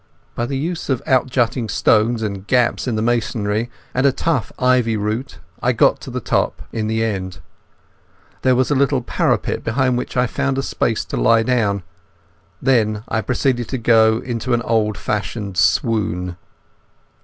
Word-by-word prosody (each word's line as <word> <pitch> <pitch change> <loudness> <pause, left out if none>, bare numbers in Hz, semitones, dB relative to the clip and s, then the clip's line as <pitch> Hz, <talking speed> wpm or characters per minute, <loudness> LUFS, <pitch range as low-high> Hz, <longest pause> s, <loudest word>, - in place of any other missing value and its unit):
By 120 - -2
the 135 - -2
use 165 +4 -3
of 130 -3 0
out 130 -3 +3
jutting 120 -2 0
stones 110 +3 +2
and 100 -2 -4
gaps 125 0 +1
in 120 - 0
the 110 - -1
masonry 115 -1 0 0.2
and 125 - +1
a 140 - +5
tough 135 -5 -1
ivy 125 -3 +2
root 110 +6 -3 0.2
I - - +2
got - - +3
to - - -8
the - - -3
top - - -1
in 110 -1 -2
the 110 0 0
end. 95 -4 -3 1.0
There 130 -1 +3
was 130 +3 +1
a - - +5
little 135 -2 +2
parapet - - 0
behind 125 +1 +1
which 125 - -5
I 125 - +4
found 135 +1 -1
space 115 - -1
to - - -4
lie 115 0 +4
down. 105 -6 0 0.8
Then 110 -5 +1
I 110 - 0
proceeded 120 +1 0
to 130 - -2
go 110 -2 +4
off - - -7
into 120 0 -1
an 120 - -2
old 110 -3 +1
fashioned 105 -2 -3
swoon. 90 -3 +1
115 Hz, 170 wpm, -19 LUFS, 110-125 Hz, 1.0 s, a